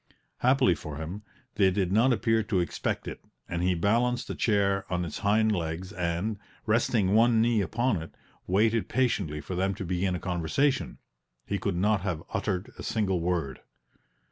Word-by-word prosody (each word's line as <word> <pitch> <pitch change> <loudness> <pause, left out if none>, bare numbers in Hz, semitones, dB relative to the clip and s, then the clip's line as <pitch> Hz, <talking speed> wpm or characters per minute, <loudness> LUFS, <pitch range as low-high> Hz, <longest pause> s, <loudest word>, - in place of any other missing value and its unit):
Happily 130 -6 +4
for 75 -2 -7
him, 85 +7 -6 0.4
they 95 - +5
did 95 -1 0
not 115 +6 +4
appear 115 -1 +2
to 100 -3 0
expect 85 - -2
it - - -7 0.2
and 85 0 -3
he 90 0 +2
balanced 120 +7 +1
a - - -4
chair 100 -3 +1
on 90 -1 0
its 80 - -6
hind 110 +2 +3
legs 85 +1 -3
and, 90 +3 -2 0.3
resting 110 -3 +2
one 115 +1 +5
knee 115 -1 +3
upon 110 0 0
it, 80 - -10 0.3
waited 110 +4 +2
patiently 100 - 0
for 95 - -6
them 95 +2 0
to 95 - -5
begin 90 +1 0
a - - -3
conversation; 90 - 0 0.5
he 100 - -2
could 95 0 -1
not 100 +2 +2
have 90 -4 -3
uttered 100 +3 -2
a - - -5
single 95 -5 0
word. 85 -6 -1
100 Hz, 170 wpm, -28 LUFS, 90-110 Hz, 0.5 s, they